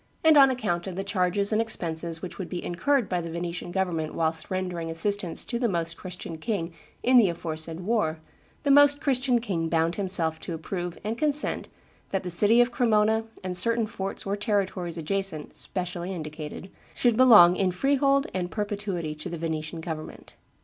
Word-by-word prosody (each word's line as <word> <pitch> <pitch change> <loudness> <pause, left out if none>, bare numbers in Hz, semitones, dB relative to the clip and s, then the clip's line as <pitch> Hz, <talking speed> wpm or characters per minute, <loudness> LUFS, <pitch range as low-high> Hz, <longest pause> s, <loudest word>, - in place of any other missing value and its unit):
And 320 -1 +6
on 275 -2 +8
account 205 -9 -2
of 185 - -5
the 195 - -3
charges 200 +1 0
and 215 - +3
expenses 170 -6 -3
which 185 - -7
would 190 - -5
be 180 - -5
incurred 240 +7 +1
by 180 -1 -1
the 170 - -6
Venetian 170 +1 -4
government 175 -4 -2
whilst 160 -1 -1
rendering 180 -3 -3
assistance 180 +1 +1
to 235 - -3
the 240 -2 +1
Most 170 -2 0
Christian 180 -3 -6
king 170 -4 -3 0.3
in 255 +1 +5
the 215 -6 +6
aforesaid 165 0 -4
war, 185 -6 0 0.5
the 285 - +2
Most 285 0 +6
Christian 255 -4 +2
king 175 -8 -2
bound 165 +1 +1
himself 175 -5 0
to 170 - -5
approve 175 +2 -5
and 220 +3 -3
consent 300 -1 0 0.4
that 195 - -2
the 180 - -4
city 210 +7 +5
of 240 0 +2
Cremona 220 -2 +2 0.2
and 185 -1 -3
certain 230 +5 +1
forts 195 -3 -5
or 200 +1 -1
territories 195 -5 -1
adjacent, 165 -1 -3
specially 180 -1 -4
indicated, 155 +1 -7 0.2
should 240 -2 +2
belong 215 -8 +8
in 190 0 +1
freehold 275 +7 +2
and 180 -1 -2
perpetuity 200 -6 -3
to 150 0 -7
the 170 - -5
Venetian 160 0 -4
government. 160 -1 -7
185 Hz, 175 wpm, -26 LUFS, 170-220 Hz, 0.5 s, on